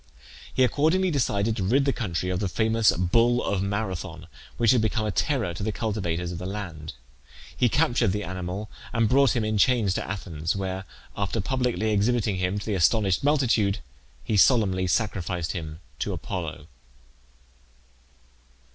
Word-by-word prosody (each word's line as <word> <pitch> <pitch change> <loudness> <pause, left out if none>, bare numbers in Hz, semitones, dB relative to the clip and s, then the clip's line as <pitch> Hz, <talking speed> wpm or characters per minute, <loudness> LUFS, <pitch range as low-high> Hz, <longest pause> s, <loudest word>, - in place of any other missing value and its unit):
He 130 - +2
accordingly 160 +8 +2
decided 110 -6 0
to 100 - -1
rid 130 +9 +2
the 135 - +2
country 90 -5 -2
of 90 - -1
the 100 - -1
famous 110 +2 +3
bull 115 +7 +2
of 100 -2 0
Marathon, 95 -6 -3 0.3
which 120 -1 +4
had 125 -3 +3
become 110 0 0
a 105 - 0
terror 115 -4 0
to 85 - -7
the 110 +2 -1
cultivators 90 -6 -2
of 85 - -6
the 90 - -5
land. 85 -7 -6 0.6
He 125 - +3
captured 120 +1 +2
the 105 +2 -2
animal 95 +3 -5 0.3
and 115 -2 +2
brought 135 +2 +4
him 115 -3 0
in 110 -1 0
chains 115 -5 +3
to - - -2
Athens, 85 -5 -3
where, 95 -1 -3 0.3
after 100 +3 -2
publicly 120 -1 0
exhibiting 105 -1 +1
him 90 +2 -1
to 105 - -5
the 110 - -1
astonished 95 +2 +2
multitude, 120 -8 +2 0.5
he 105 - 0
solemnly 95 -5 +4
sacrificed 90 -3 -1
him 80 -2 -6 0.2
to - - -2
Apollo. 80 -4 -5
105 Hz, 160 wpm, -26 LUFS, 90-115 Hz, 0.6 s, which